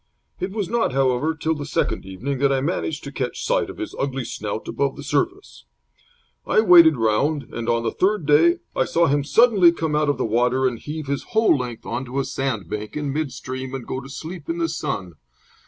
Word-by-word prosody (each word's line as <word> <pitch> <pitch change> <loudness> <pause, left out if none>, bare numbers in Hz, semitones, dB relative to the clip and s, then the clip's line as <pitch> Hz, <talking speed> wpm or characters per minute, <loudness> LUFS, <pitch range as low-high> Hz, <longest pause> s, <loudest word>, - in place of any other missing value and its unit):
It 185 - -2
was 200 -1 -3
not, 230 - 0
however, 135 +4 +1
till 160 +1 -1
the 150 -2 -5
second - - -1
evening 125 +9 -4
that 140 0 +3
I 135 - +2
managed 155 +1 -2
to 140 - -7
catch 130 -3 -4
sight - - +1
of - - -9
his - - -5
ugly 135 -2 -2
snout 110 -1 -5
above 140 -1 -1
the - - -9
surface. - - -2 0.8
I - - +3
waited 170 -6 +8
around, 130 +6 +1
and 120 0 -3
on 115 0 +1
the 115 - 0
third 200 -3 +1
day 160 +4 +4
I - - +2
saw 170 0 +2
him 145 -1 +1
suddenly 200 - +5
come 160 -3 -2
out 150 -1 +2
of 145 - +1
the - - -1
water 125 +4 +1
and 120 -3 -3
heave 155 +2 -6
his 140 0 -2 0.2
whole 225 - +5
length 125 -4 -5
on 130 - -3
to 130 +2 -6
a 135 - 0
sandbank 110 - -3
in 145 -2 -2
mid 150 -2 -2
stream 130 +1 -6
and 130 -3 -6
go 130 - -4
to 135 - -11
sleep 160 +4 -8
in 165 - -1
the 165 -1 0
sun. 135 - -4
140 Hz, 220 wpm, -22 LUFS, 125-160 Hz, 0.8 s, waited